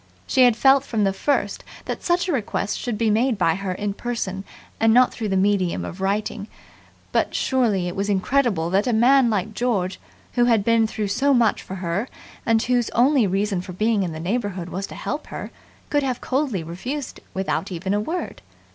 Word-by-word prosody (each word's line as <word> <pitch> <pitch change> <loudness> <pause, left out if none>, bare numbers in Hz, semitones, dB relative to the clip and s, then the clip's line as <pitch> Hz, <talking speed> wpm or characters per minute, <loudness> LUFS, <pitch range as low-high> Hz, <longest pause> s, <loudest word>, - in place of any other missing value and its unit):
She 260 -1 +4
had 245 -2 +4
felt 270 +1 +5
from 225 -6 -1
the 195 -1 +2
first 285 +8 -1 0.2
that - - -4
such 350 +1 +1
a - - 0
request 210 -6 -2
should 240 -4 -3
be 220 -1 +2
made 230 +2 +2
by 170 -4 +3
her 195 +1 -3
in 200 +2 -2
person 200 -4 -4 0.4
and 225 0 +4
not 255 0 +5
through 225 - -3
the 190 - +1
medium 185 - +1
of 180 - -8
writing, 205 +1 -1 0.6
but - - 0
surely 225 -9 +1
it 175 - -4
was 200 +1 -2
incredible 200 -4 +1
that 200 +5 +2
a 245 - +2
man 245 +3 +5
like 210 0 -1
George, 205 -6 -1 0.3
who 240 -1 +3
had 230 -4 +3
been 230 0 +3
through 215 -2 -3
so 275 +7 +2
much 230 -4 +2
for 190 - -7
her 185 +5 -2 0.4
and 225 0 +3
whose 245 -1 +1
only 255 -1 +4
reason 195 0 0
for 180 0 -8
being 215 +2 +1
in 180 -3 -2
the 155 - -6
neighbourhood 190 -1 -2
was 195 +2 -4
to - - -10
help 300 +1 -4
her, - - -7 0.4
could 290 - +3
have 255 -3 -2
coldly 260 - -1
refused 245 - -5 0.2
without 190 0 -2
even 185 +2 -2
a 205 - +2
word. 330 +12 -4
215 Hz, 200 wpm, -23 LUFS, 190-245 Hz, 0.6 s, felt